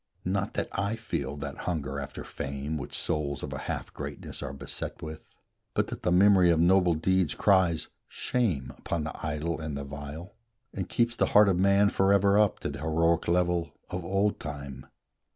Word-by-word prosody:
Not 95 +1 -1
that - - -1
I 100 +3 -1
feel 85 -10 -4
that 70 -1 -5
hunger 70 -5 -2
after 70 -1 -6
fame, 70 +2 -4
Which 70 - -4
souls 75 -4 -1
of - - -4
a - - -4
half - - -4
greatness - - -6
are - - -4
beset 70 - -6
with; 80 0 -9 0.4
But - - +1
that - - -6
the 90 - +1
memory 95 -1 +6
of 85 -2 +4
noble 90 0 +4
deeds 95 0 +1
Cries, 90 -6 +3 0.2
shame 90 - -1
upon 85 -2 -2
the 80 - -5
idle 80 +2 -2
and 75 -2 -4
the 70 - -4
vile, 75 +6 -8 0.4
And 95 -2 -4
keeps 120 0 +1
the - - +2
heart 105 -1 +8
of 90 -2 +2
Man 100 +1 +5
forever 100 +1 +4
up 105 -2 +3
To - - -2
the - - -7
heroic 85 +1 +2
level 85 -1 +1 0.2
of 90 0 -3
old 100 +4 +1
time. 70 -4 -7
85 Hz, 185 wpm, -28 LUFS, 75-95 Hz, 0.4 s, heart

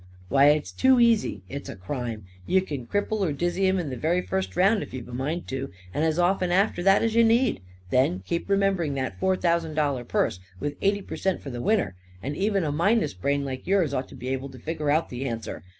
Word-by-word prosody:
"Why, 140 +1 +5
it's 150 +1 +3
too 260 -1 +4
easy! 235 -2 +3
It's 140 +1 -6
a - - -6
crime. 115 +1 -5 0.2
You 190 - +4
c'n 145 -10 -6
cripple 205 +1 -1
or 185 -6 +1
dizzy 175 +6 0
him 190 0 +2
in 165 -6 -3
the - - -3
very 170 +7 0
first 190 0 -2
round 195 +4 +4
if - - -7
you've 125 -2 -7
a 125 - -10
mind 150 +8 -3
to. 135 +1 -3 0.2
And 150 - 0
as 160 0 +1
often 180 +1 +2
after 190 0 +2
that 195 +3 +4
as 230 -1 +1
you 230 +1 +5
need. 230 - +3 0.3
Then, 110 -8 +2
keep 170 - -3
remembering 195 -7 +1
that 130 -1 -3
four 190 0 +2
thousand 170 -3 0
dollar 140 -5 0
purse, 105 -5 0 0.2
with 145 +5 -3
eighty 200 0 +1
per - - -7
cent 190 -1 0
for 140 - -7
the 120 -1 -5
winner. 210 - +1 0.3
And 140 +2 -3
even 195 0 +1
a 150 - -1
minus 200 +10 +2
brain 140 +10 -1
like 130 -1 -6
yours 185 -7 +2
ought 130 -1 -2
to - - -11
be 125 - -6
able 135 +1 -3
to 130 - -12
figger 155 +1 -3
out 155 +3 +2
the 130 +2 -4
answer. 115 -3 -5
160 Hz, 235 wpm, -26 LUFS, 135-195 Hz, 0.3 s, Why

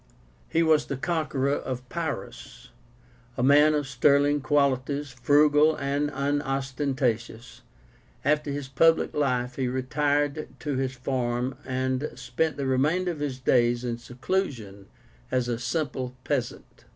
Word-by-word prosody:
He 165 - +2
was 160 -2 +3
the 140 - -3
conqueror 145 -3 0
of 130 -3 -4
Pyrrhus. 155 - -6 0.7
A 125 - 0
man 150 +3 +6
of 145 -2 -1
sterling 140 +3 +3
qualities, 140 0 +1
frugal 150 +4 +4
and 140 +1 -1
unostentatious, 135 -4 -2 0.6
after 150 +1 +2
his 140 -1 -4
public 165 +5 +3
life 125 -3 -1
he 130 -2 0
retired 145 +3 0
to 145 -3 -2
his 130 0 -2
farm 125 0 -2
and 130 +2 -1
spent 130 +5 -2
the 140 - -2
remainder 150 +8 +1
of 160 - -7
his 145 -3 -3
days 120 -1 +2
in 120 -1 -3
seclusion 120 - -3 0.4
as 125 -1 0
a 120 -2 -2
simple 130 -1 -3
peasant. 130 -5 -4
135 Hz, 125 wpm, -26 LUFS, 125-145 Hz, 0.7 s, man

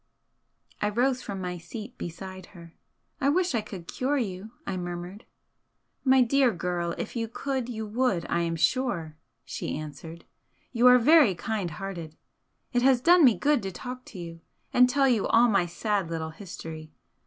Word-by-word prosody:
I 205 - +2
rose 250 +4 +1
from 200 -4 -5
my 180 -1 -4
seat 215 +8 -8
beside 185 +2 -7
her. 170 -1 -13 0.5
"I 280 -2 +2
wish 355 +3 +1
I 230 - +1
could 190 -5 -9
cure 275 +3 -1
you!" 200 -4 -3 0.2
I - - -3
murmured. 175 +3 -6 0.8
"My 260 -1 +5
dear 260 +1 +3
girl, 175 -2 -2
if - - -5
you 230 -1 -1
could, 260 +1 -3
you 220 -2 -4
would, 215 -5 0
I - - 0
am 165 -1 -1
sure," 170 -5 0 0.3
she - - -4
answered 155 +2 -9 0.5
"You 240 0 +4
are 250 0 +9
very 275 - +6
kind 205 0 -3
hearted. 170 -3 -7 0.6
It 245 - +2
has 260 -1 +5
done 345 +5 +6
me 245 -6 +7
good 290 -3 +2
to 195 -1 -4
talk 250 +7 -7
to 200 - -11
you 165 -1 -8 0.3
and 250 0 +6
tell 275 +1 +3
you 235 -6 +2
all 235 +1 +5
my 195 -6 +2
sad 200 0 -1
little 160 -1 -3
history. 160 -3 -9
210 Hz, 175 wpm, -27 LUFS, 175-250 Hz, 0.8 s, are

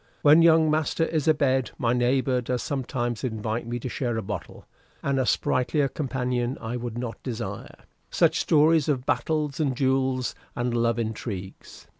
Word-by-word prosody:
"When 150 +3 +7
young 160 -2 +5
master 155 +1 +1
is 160 -3 -1
abed, 135 -5 +2
my 120 -1 +1
neighbor 125 +1 +1
does 125 0 -2
sometimes 120 -4 -3
invite 110 -1 -3
me 120 +1 -2
to - - -4
share 120 -2 -2
a 110 - -2
bottle; 100 +1 -7 0.4
and 140 -1 +1
a 130 - 0
sprightlier 140 +3 +1
companion 125 -2 -2
I 115 +1 -4
would 120 -1 -5
not 120 -2 -5
desire. 110 -5 -6 0.3
Such - - +2
stories 155 -1 +4
of 130 -3 0
battles, 150 -2 -1
and 140 -4 +1
duels, 130 -1 0 0.2
and 120 -1 -1
love 115 -1 +1
intrigues!" 110 -4 -6
125 Hz, 160 wpm, -25 LUFS, 120-140 Hz, 0.4 s, When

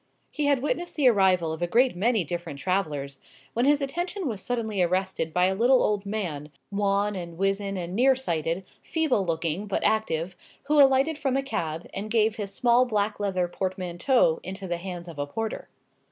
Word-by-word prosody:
He 300 - -2
had 280 -3 +2
witnessed 345 +4 -2
the 285 -4 +3
arrival 185 -7 +3
of 160 - -7
a 175 - +1
great 245 +6 +3
many 220 +2 +2
different 170 -2 -5
travellers, 145 -6 -2 0.3
when 240 +2 +1
his 285 0 +3
attention 350 +5 -3
was 215 -6 -4
suddenly 220 -5 -2
arrested 185 -2 0
by 180 +2 +3
a 190 - +2
little 245 +6 +4
old 205 -1 0
man, 170 -9 -3 0.2
wan 200 0 +1
and 170 -2 -7
wizen 195 +1 -1
and 175 0 -4
near 260 +4 +5
sighted, 170 - -2 0.2
feeble 315 -11 0
looking, 165 +3 -2
but 195 - -1
active, 185 -5 0 0.3
who 295 +1 +4
alighted 275 +3 +4
from 270 -3 0
a 275 - 0
cab, 165 - -3
and 205 +2 -4
gave 220 -1 +2
his 205 -2 -4
small 240 +4 +3
black 210 -3 -1
leather 185 -3 0
portmanteau 185 - +1
into 190 +1 -6
the 175 -1 -2
hands 175 -1 -7
of 160 -4 -9
a 145 - -2
porter. 220 +9 -4
200 Hz, 185 wpm, -26 LUFS, 175-245 Hz, 0.3 s, near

